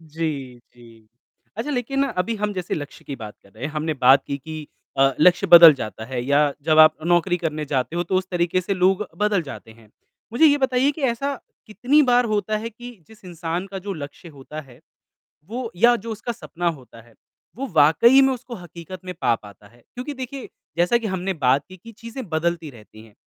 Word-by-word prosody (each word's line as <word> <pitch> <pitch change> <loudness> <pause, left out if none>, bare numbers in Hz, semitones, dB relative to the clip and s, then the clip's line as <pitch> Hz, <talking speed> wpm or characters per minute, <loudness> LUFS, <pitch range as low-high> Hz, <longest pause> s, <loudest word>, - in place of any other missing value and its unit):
जी, 150 -6 -5 0.2
जी, 115 -2 -18 0.5
अच्छा, 240 +7 -3
लेकिन 270 +1 -1
अभी 225 -1 -2
हम 210 0 -2
जैसे 185 -3 -3
लक्ष्य 145 -2 -8
की 140 - -6
बात 105 -3 -9
कर 100 - -22
रहे 115 +6 -9
हैं 150 - -3
हमने 155 +1 -2
बात 130 0 +5
की 140 - -4
कि 155 +2 -8 0.3
अ, 135 0 +4
लक्ष्य 180 +3 +4
बदल 170 -2 +10
जाता 110 -3 -7
है 125 +1 -4
या 145 +2 +2
जब 155 +1 +2
आप 155 0 +8
नौकरी 175 +1 +2
करने 155 -3 -3
जाते 140 +2 -2
हो 175 - +1
तो 180 - -3
उस 185 0 -1
तरीक़े 175 0 0
से 190 +2 -2
लोग 190 +2 +2
बदल 210 -4 +1
जाते 140 -5 -10
हैं। 110 -1 -18 0.4
मुझे 245 +7 +3
ये 290 -1 +4
बताइए 265 0 +2
कि 310 - -10
ऐसा 275 +4 -3 0.3
कितनी 245 +8 +2
बार 245 -2 +3
होता 210 +1 0
है 230 +2 -5
कि 240 +3 -10 0.2
जिस 220 -3 -18
इंसान 170 +1 -4
का 195 0 -7
जो 200 - -2
लक्ष्य 150 +2 -9
होता 150 0 -9
है 130 -5 -17 0.7
वो 240 +1 -4
या 240 +7 +5
जो 230 +1 -6
उसका 220 +2 -4
सपना 175 -6 -5
होता 130 -8 -6
है, 115 0 -22 0.4
वो 270 +4 -4
वाक़ई 165 - +6
में 270 0 +3
उसको 250 -1 -8
हकीकत 175 0 -10
में 180 - -5
पा 115 - +3
पाता 105 -1 -15
है 120 +3 -24
क्योंकि 255 +4 -6
देखिए 260 0 -7 0.3
जैसा 175 +7 +3
कि 230 -2 -4
हमने 190 0 -2
बात 135 +3 +3
की 185 - -12
कि 230 +6 -13
चीज़ें 230 +4 -8
बदलती 165 0 -1
रहती 110 -3 -15
हैं 110 - -20
175 Hz, 210 wpm, -22 LUFS, 145-225 Hz, 0.7 s, बदल